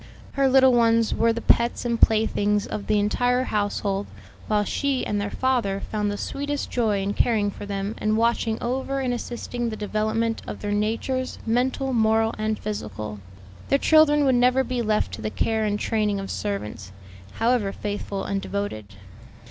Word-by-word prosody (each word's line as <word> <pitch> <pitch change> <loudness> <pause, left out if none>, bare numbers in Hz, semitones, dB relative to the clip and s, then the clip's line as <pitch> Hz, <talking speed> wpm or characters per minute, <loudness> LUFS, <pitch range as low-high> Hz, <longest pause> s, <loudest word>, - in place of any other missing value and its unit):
Her 275 -1 +2
little 265 -1 +6
ones 230 -1 +3
were 230 +1 +3
the 230 +1 -3
pets 235 +2 +2
and 235 -1 -1
playthings 210 -2 +3
of 205 - -5
the 210 - +2
entire 245 +5 +1
household, 205 -3 -1 0.4
while 210 -1 +2
she 275 +4 -1
and 205 -1 -1
their 205 - -2
father 235 -7 0
found 210 -1 0
the 205 - -3
sweetest 285 +4 -3
joy 215 -5 +1
in 200 +1 -1
caring 210 -3 +1
for 205 - -9
them 200 +1 -3
and 215 0 +1
watching 230 -1 +1
over 265 +3 -1
and 255 -2 -1
assisting 240 0 -4
the 220 - -4
development 220 +2 -1
of - - -6
their 205 - -3
natures, 230 +5 -1
mental, 255 +3 0
moral, 225 -1 +2
and 215 0 -1
physical. 105 - -5 0.5
Their 275 - +4
children 295 -1 +5
would 265 - +4
never 250 +2 +4
be 250 -1 -2
left 215 - 0
to 100 - -6
the 110 - -2
care 220 - 0
and 210 0 -1
training 210 -2 0
of 195 - -5
servants, 110 - -4 0.4
however 225 -3 +1
faithful 205 -1 -4
and 195 0 -2
devoted. 110 - -5
220 Hz, 170 wpm, -24 LUFS, 205-245 Hz, 0.5 s, little